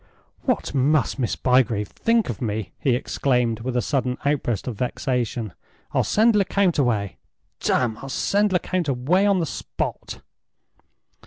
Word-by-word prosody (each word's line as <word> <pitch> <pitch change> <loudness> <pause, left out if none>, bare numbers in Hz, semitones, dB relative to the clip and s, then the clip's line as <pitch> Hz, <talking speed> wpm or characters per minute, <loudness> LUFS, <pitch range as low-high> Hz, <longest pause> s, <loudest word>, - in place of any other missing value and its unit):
"What - - 0
must 140 +1 +2
Miss 120 - 0
Bygrave 120 -5 +2
think 230 -1 +1
of 115 - -5
me!" 110 -3 -3
he 130 -3 +2
exclaimed, 125 -3 0
with 125 +2 -2
a 125 - +1
sudden 130 -3 -1
outburst 135 -8 0
of 125 - -3
vexation. 120 - -2 0.4
"I'll - - +2
send 225 +1 +3
Lecount 195 -4 +2
away. 110 -7 0 0.4
Damme, 115 -3 0
I'll 135 - -8
send 205 +8 +1
Lecount 180 -1 0
away 145 +10 +2
on 200 -1 +3
the 165 - 0
spot!" - - -5
130 Hz, 145 wpm, -23 LUFS, 120-170 Hz, 0.4 s, send